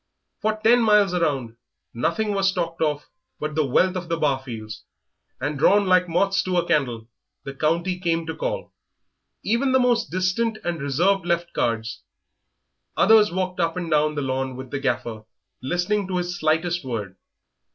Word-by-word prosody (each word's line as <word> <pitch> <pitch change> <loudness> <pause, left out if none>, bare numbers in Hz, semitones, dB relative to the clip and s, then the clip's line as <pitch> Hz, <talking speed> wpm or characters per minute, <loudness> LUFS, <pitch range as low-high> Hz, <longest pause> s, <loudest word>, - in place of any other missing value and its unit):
For 215 0 +1
ten 240 +2 +5
miles 210 -4 +4
around 135 -10 -1 0.4
nothing 170 - -1
was 195 -1 +2
talked 170 -3 -3
of 150 -2 -1 0.3
but 150 0 -3
the 155 0 +1
wealth 185 +8 +2
of 175 -2 -5
the 165 - 0
Barfields, 130 -8 -3 0.6
and, 145 +2 -3
drawn 200 +6 +4
like 185 -1 +3
moths 195 +3 +2
to 185 -1 -1
a 175 0 +1
candle, 120 -8 0 0.4
the 135 - -6
county 170 +5 0
came 165 -2 0
to 160 - -5
call; - - -4 0.7
even 250 +5 +1
the 260 - +5
most 240 -2 +2
distant 185 +5 0
and 170 -4 -3
reserved 175 +8 +1
left 170 0 -1
cards, 115 -1 -2 1.0
others 215 0 +5
walked 185 0 -2
up 165 0 0
and 170 -2 -4
down 150 0 +2
the 145 - -2
lawn 130 0 -2
with 130 0 -9
the 145 - -2
Gaffer, 115 -5 -2 0.4
listening 180 +8 -1
to 185 -1 -2
his 175 0 -2
slightest 165 +2 0
word. 105 -7 -5
170 Hz, 165 wpm, -23 LUFS, 140-190 Hz, 1.0 s, ten